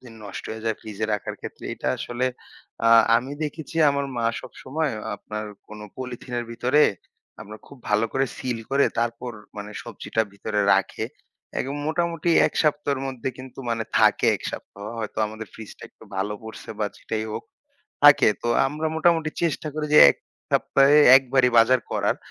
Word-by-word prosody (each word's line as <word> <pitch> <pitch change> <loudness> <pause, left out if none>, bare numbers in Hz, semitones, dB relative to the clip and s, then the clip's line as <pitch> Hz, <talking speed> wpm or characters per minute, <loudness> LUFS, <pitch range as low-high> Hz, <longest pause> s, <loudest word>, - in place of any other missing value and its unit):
দিন 120 -3 -13
নষ্ট 100 0 -7
হয়ে 110 0 -7
যায় 110 -1 0
ফ্রিজে 110 -1 -5
রাখার 105 - -5
ক্ষেত্রে। - - -9
এটা - - -3
আসলে 120 +1 -2 0.6
আ - - +4 0.3
আমি 130 +4 -3
দেখেছি 155 +1 -5
আমার 140 0 -1
মা 120 - -1 0.2
সবসময় 150 +3 -4 0.3
আপনার 105 +1 -6 0.2
কোনো 105 0 -9
পলিথিনের 125 -1 -5
ভিতরে, 125 +6 +2 0.6
আপনার 105 +1 -9
খুব 140 - -14
ভালো 105 +1 +2
করে 135 0 +1
সিল 125 -3 -3
করে 140 +1 +4
তারপর 120 +1 -2 0.2
মানে 105 0 -6
সবজিটা 110 - -2
ভিতরে 105 +1 -2
রাখে 95 -1 0 0.6
এবং 135 +2 -3
মোটামুটি 170 +1 -1 0.2
১ - - -3
সপ্তাহের 145 -3 0
মধ্যে 130 -1 -4
কিন্তু 130 0 -11
মানে 115 -1 -1
থাকে - - +4
১ - - -15
সপ্তাহ। 100 - -9 0.2
হয়তো 110 -2 -5
আমাদের 110 +1 -8
ফ্রিজটা 110 -2 -11
একটু - - -18
ভালো 100 +2 -1
পড়ছে 110 0 -9
বা 105 - 0
যেটাই 110 0 -4
হোক, - - -5 0.6
থাকে। - - +8
তো - - -3 0.2
আমরা 150 +3 -3
মোটামুটি 160 -1 +2
চেষ্টা 165 -2 -1
করি 155 -1 -2
যে - - +10
১ - - -18 0.4
সপ্তাহে 140 +2 +4 0.2
১ 135 - +6
বারই 130 -2 +5
বাজার 125 +3 +6
করার। - - +1
125 Hz, 165 wpm, -24 LUFS, 110-140 Hz, 0.6 s, যে